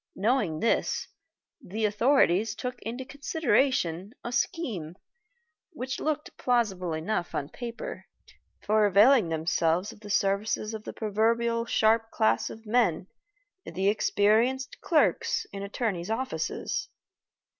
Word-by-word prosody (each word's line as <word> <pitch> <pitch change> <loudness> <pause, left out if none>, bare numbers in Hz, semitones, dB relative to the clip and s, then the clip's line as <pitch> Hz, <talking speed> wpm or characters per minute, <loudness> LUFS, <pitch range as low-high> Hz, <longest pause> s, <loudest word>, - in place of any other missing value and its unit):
Knowing 205 -7 0
this, 230 - +1 0.6
the 215 +1 -2
authorities 215 -2 +3
took 250 -1 -5
into 245 +3 -5
consideration 265 - 0
a 240 - -4
scheme, 235 - -2 0.8
which 260 -3 -4
looked 305 0 -3
plausible 210 -8 0
enough 170 +3 -2
on 140 - -2
paper, 240 - -7 0.6
for 215 0 +3
availing 210 0 +5
themselves 165 +3 0
of - - -15
the 210 -1 -11
services 205 +2 0
of 215 -1 -7
that - - -7
proverbially 230 +2 0
sharp 225 +1 +3
class 220 -1 +1
of 220 +1 -11
men, 215 -7 +2 0.6
the 190 +2 0
experienced 220 +5 +1
clerks 320 -4 +2
in 195 - -5
attorney's 200 -3 -3
offices. 260 - -2
220 Hz, 115 wpm, -28 LUFS, 195-245 Hz, 0.8 s, availing